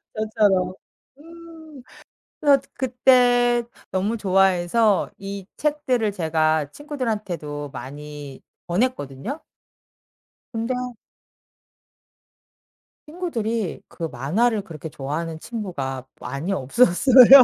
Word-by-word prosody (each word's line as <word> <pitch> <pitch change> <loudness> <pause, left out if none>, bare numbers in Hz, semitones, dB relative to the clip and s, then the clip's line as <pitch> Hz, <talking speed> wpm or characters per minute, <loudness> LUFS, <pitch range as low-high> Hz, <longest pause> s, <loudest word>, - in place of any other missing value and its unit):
맞아요. 205 -4 +2 0.4
음. 325 -3 -13 0.6
그래서 285 -3 +5
그때 245 -1 +4 0.3
너무 200 +5 0
좋아해서 195 +1 +3
이 195 -1 -6
책들을 260 -8 0
제가 155 -4 +1
친구들한테도 205 - -4
많이 145 +1 -8 0.2
권했거든요? 205 - -2 1.1
근데 230 +2 -2 2.3
친구들이 230 - -2
그 170 - -9
만화를 185 - +1
그렇게 160 -3 -8
좋아하는 155 +4 -4
친구가 140 - -4
많이 140 +9 -4
없었어요. 250 - +7
205 Hz, 205 characters per minute, -23 LUFS, 160-250 Hz, 2.3 s, 없었어요